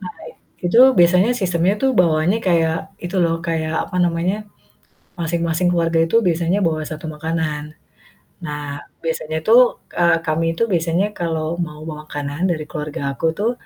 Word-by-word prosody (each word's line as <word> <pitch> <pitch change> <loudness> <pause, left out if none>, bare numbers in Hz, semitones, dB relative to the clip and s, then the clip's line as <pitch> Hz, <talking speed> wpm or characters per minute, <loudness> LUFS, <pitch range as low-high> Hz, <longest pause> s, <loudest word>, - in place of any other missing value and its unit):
Nah, - - -8 0.5
itu 225 +7 +3 0.2
biasanya 180 +6 +5
sistemnya 180 +1 +1
tuh 265 - +4
bawaannya 170 +4 +2
kayak 165 -2 +2 0.3
itu 175 +2 -3
loh 165 -1 +1
kayak, 160 -1 -1
apa 180 - -6
namanya, 175 +3 0 0.8
masing-masing 170 +1 0
keluarga 165 -1 +1
itu 165 - -2
biasanya 170 +3 +1
bawa 160 -1 0
1 155 0 -7
makanan. 155 -1 -2 0.8
Nah 145 -2 -5 0.2
biasanya 160 -1 -2
tuh, 235 +3 +8 0.4
eee, 170 -1 +5
kami 160 +1 0
itu - - -1
biasanya 170 +3 +1
kalau 165 -1 -2
mau 150 -1 -11
bawa 150 -1 -7
makanan 145 0 -5
dari 155 -3 -2
keluarga 150 -2 -5 0.2
aku 165 - -1
tuh 215 +3 +1
165 Hz, 150 wpm, -20 LUFS, 155-175 Hz, 0.8 s, tuh